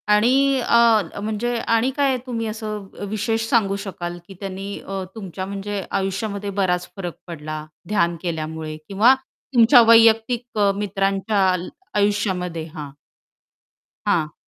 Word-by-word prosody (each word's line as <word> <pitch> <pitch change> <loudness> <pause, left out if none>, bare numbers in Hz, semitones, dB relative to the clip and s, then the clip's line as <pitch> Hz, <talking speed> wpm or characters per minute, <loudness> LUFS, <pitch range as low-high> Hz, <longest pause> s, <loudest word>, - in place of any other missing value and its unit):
आणि 265 +5 +3
अ, 230 -6 +3
म्हणजे 220 +3 -2 0.2
आणि 230 +4 +2
काय 275 -2 +2
तुम्ही 230 -2 -2
असं 215 -2 -5
अ, - - -5
विशेष 225 +2 -1
सांगू 205 -6 +2
शकाल 175 -3 -5
की 195 - -10
त्यांनी 195 0 -5
अ, 195 -1 -5
तुमच्या 190 -3 -6
म्हणजे 200 0 -4 0.2
आयुष्यामध्ये 200 +1 -3
बराच 180 -1 0
फरक 175 -4 -5
पडला 155 -2 -6 0.2
ध्यान 175 -5 +1
केल्यामुळे 160 -2 -4
किंवा 215 +6 +5 0.4
तुमच्या 240 +1 +7
वैयक्तिक 230 +1 +4
अ, 200 -1 +4
मित्रांच्या 195 0 0 0.5
आयुष्यामध्ये 190 -5 0
हां. 150 -2 -6 1.2
हां. 160 -7 +1
200 Hz, 125 wpm, -22 LUFS, 185-225 Hz, 1.2 s, तुमच्या